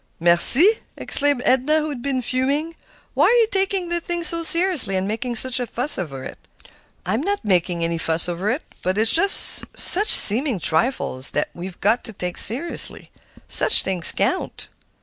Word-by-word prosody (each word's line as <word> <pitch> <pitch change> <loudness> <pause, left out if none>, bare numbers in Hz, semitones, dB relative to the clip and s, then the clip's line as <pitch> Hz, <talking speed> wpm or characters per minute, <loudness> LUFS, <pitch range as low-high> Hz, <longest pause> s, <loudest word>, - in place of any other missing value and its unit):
"Mercy!" 245 - +5 0.2
exclaimed 285 -3 -1
Edna, 265 +4 0
who 310 0 -4
had 275 -5 -8
been 260 -1 -4
fuming. 280 +7 -3 0.4
"Why - - +1
are 485 - +1
you 450 - 0
taking 385 -2 -3
the 345 0 -2
thing 345 0 -5
so 335 -1 0
seriously 335 - +1
and 190 +1 -3
making 235 +3 -6
such 255 +2 +4
a 245 - -5
fuss 250 +3 -2
over 135 -7 -8
it?" - - -11 0.7
"I'm 215 +8 -3
not 400 - -5
making 175 -3 -2
any 165 0 -4
fuss 160 +1 +1
over 175 +4 -5
it. 260 +7 -4 0.2
But 185 +2 -4
it's 220 +1 +3
just 395 +4 +3
such 410 +4 +2
seeming 240 +3 +3
trifles 160 - -3
that 145 - -2
we've 180 +1 -11
got 220 +5 -1
to 225 - -9
take 180 -2 -4
seriously; 275 - +2 0.4
such - - +3
things 185 -3 +3
count." - - -5
245 Hz, 175 wpm, -19 LUFS, -, 0.7 s, Mercy